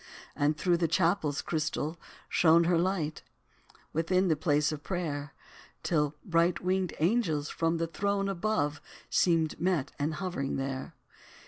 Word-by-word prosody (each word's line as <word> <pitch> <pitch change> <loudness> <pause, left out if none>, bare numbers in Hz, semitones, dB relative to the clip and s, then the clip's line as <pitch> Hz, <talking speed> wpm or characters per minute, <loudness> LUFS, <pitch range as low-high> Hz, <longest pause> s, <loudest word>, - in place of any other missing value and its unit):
And 145 +1 +1
through 175 -1 +2
the 170 -1 +1
chapel's 165 -2 +1
crystal 155 +1 -2 0.3
shone 165 0 +5
Her 170 0 +3
light, 170 -4 -1 0.7
within 180 +4 +2
the 160 - +4
place 150 0 +1
of 150 -1 -5
prayer, 150 -5 -3 0.5
Till 150 -3 +1
bright 170 -1 +2
winged 185 -1 -1
angels, 160 -5 +1
from 165 0 0
the 165 - 0
throne 200 +4 -1
Above, 190 -6 -1 0.3
seemed 165 -3 +2
met 175 -6 +1
and 150 +2 -1
hovering 155 -5 -3
there. 135 +3 -4
165 Hz, 135 wpm, -30 LUFS, 150-180 Hz, 0.7 s, shone